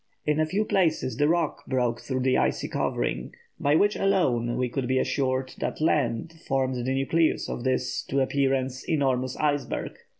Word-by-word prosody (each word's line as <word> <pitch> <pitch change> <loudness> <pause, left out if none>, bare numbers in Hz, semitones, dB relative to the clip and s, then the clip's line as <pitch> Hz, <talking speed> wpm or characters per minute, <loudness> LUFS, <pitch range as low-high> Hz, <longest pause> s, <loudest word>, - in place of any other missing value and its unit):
In 150 0 +1
a 155 - +2
few 205 +6 0
places 165 -10 +1
the 145 +1 +3
rock 170 +2 0
broke 125 -3 0
through 130 -1 -2
the 130 0 +2
icy - - +1
covering, - - -2 0.2
by 145 +1 +3
which 205 +5 +3
alone 130 -12 +1
we 125 - +1
could 125 +1 -3
be 130 +1 +1
assured 130 0 0
that - - -3
land 155 -2 +1
formed 130 -1 +1
the 130 - -1
nucleus 145 +5 +1
of 120 - -4
this, 130 -1 0
to 135 - 0
appearance, 135 -1 0
enormous 130 -4 0
iceberg." 145 -3 -1
135 Hz, 170 wpm, -26 LUFS, 130-155 Hz, 0.2 s, the